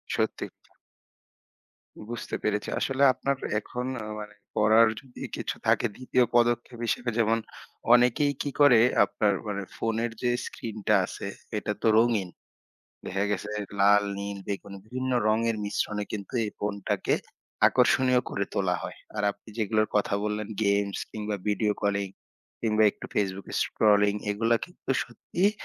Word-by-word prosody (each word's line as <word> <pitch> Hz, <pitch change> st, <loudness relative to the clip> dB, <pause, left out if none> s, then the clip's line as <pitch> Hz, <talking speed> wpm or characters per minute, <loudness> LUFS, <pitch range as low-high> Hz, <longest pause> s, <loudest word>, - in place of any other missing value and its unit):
সত্যি -, -, -1 dB
কথা। -, -, -33 dB, 1.4 s
বুঝতে 120 Hz, -1 st, -4 dB
পেরেছি। 105 Hz, -1 st, 0 dB
আসলে 135 Hz, +1 st, +1 dB
আপনার 140 Hz, +2 st, -1 dB, 0.2 s
এখন 125 Hz, +3 st, -5 dB, 0.2 s
ও -, -, -6 dB
মানে 105 Hz, 0 st, -9 dB, 0.2 s
করার 110 Hz, +1 st, +6 dB
যদি 130 Hz, -2 st, -14 dB
কিছু -, -, -3 dB
থাকে -, -, +3 dB
২য় 130 Hz, -1 st, +2 dB
পদক্ষেপ 120 Hz, 0 st, +2 dB
হিসেবে 120 Hz, +1 st, 0 dB
যেমন 115 Hz, 0 st, +3 dB, 0.6 s
অনেকেই 125 Hz, +4 st, +4 dB
কি 145 Hz, -, -1 dB
করে, 140 Hz, -5 st, +8 dB, 0.3 s
আপনার 105 Hz, 0 st, +1 dB
মানে 100 Hz, -1 st, -3 dB
ফোনের 115 Hz, +1 st, -1 dB
যে 125 Hz, -, +2 dB
screen 110 Hz, -2 st, -7 dB
টা 105 Hz, -, +6 dB
আছে 100 Hz, -, -6 dB, 0.3 s
এটা 105 Hz, -, -2 dB
তো -, -, +2 dB
রঙিন। 110 Hz, -5 st, +3 dB, 0.8 s
দেখা 95 Hz, +2 st, -1 dB
গেছে 105 Hz, 0 st, -2 dB, 0.3 s
লাল, 105 Hz, +1 st, +6 dB
নীল, 100 Hz, 0 st, -4 dB
বেগুনি 100 Hz, 0 st, -5 dB
বিভিন্ন 130 Hz, +2 st, -3 dB
রঙের 115 Hz, +1 st, +2 dB
মিশ্রণে 105 Hz, 0 st, -1 dB
কিন্তু 100 Hz, -2 st, -5 dB
এই 105 Hz, -, -3 dB
phone 105 Hz, 0 st, -2 dB
টাকে -, -, +1 dB, 0.5 s
আকর্ষণীয় 130 Hz, -1 st, +4 dB
করে 100 Hz, -, -1 dB
তোলা 90 Hz, -2 st, +1 dB
হয়। -, -, -7 dB, 0.2 s
আর 105 Hz, -, -1 dB
আপনি 100 Hz, +2 st, -15 dB
যেগুলোর 110 Hz, 0 st, +1 dB
কথা 100 Hz, -1 st, +1 dB
বললেন 105 Hz, 0 st, -2 dB, 0.2 s
games 100 Hz, 0 st, +1 dB
কিংবা 105 Hz, -1 st, -3 dB
video 105 Hz, 0 st, +2 dB
calling 100 Hz, -1 st, 0 dB, 0.5 s
কিংবা 110 Hz, -1 st, +2 dB
একটু -, -, -10 dB
Facebook 100 Hz, -1 st, -1 dB, 0.2 s
scrolling 105 Hz, -1 st, +3 dB
এগুলা 115 Hz, +3 st, +2 dB
কিন্তু 180 Hz, -6 st, -9 dB
সত্যিই 175 Hz, -, 0 dB
110 Hz, 145 wpm, -27 LUFS, 100-120 Hz, 1.4 s, করে